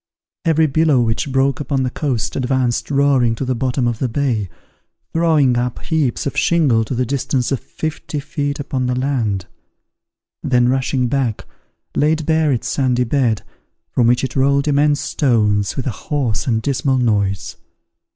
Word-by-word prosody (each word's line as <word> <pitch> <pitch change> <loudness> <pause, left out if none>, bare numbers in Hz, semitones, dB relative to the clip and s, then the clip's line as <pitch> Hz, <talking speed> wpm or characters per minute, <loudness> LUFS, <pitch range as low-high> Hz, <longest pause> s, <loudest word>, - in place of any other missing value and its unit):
Every 160 -1 +3
billow 155 -1 +3
which 120 +3 0
broke 135 0 +1
upon 140 -2 -1
the 125 - -1
coast 130 -6 -2
advanced 130 -2 0
roaring 135 -5 +3
to 135 - -3
the 130 - 0
bottom 125 +1 -1
of 120 -1 -2
the 130 - -1
bay, 115 -6 -1 0.6
throwing 155 -7 +3
up 120 0 -2
heaps 155 -7 -1
of 140 - -3
shingle 145 -10 +3
to 125 - -4
the 125 +1 0
distance 130 0 -1
of 135 - 0
fifty 155 -1 -5
feet 145 0 -3
upon 130 -2 -2
the 125 - 0
land; 120 -8 -1 1.0
then, 125 -1 +2
rushing 130 0 0
back, 125 -4 -1 0.5
laid 155 +1 +1
bare 160 -1 +2
its 125 - -1
sandy 125 -3 +1
bed, 120 -3 0 0.5
from 120 - +2
which 120 +2 +2
it 130 - -3
rolled 140 +2 +2
immense 145 0 +2
stones, 105 - +1
with 135 - -3
a 130 - 0
hoarse 130 -2 -2
and 110 -3 0
dismal 135 -1 +1
noise. 100 - 0
130 Hz, 160 wpm, -18 LUFS, 120-145 Hz, 1.0 s, Every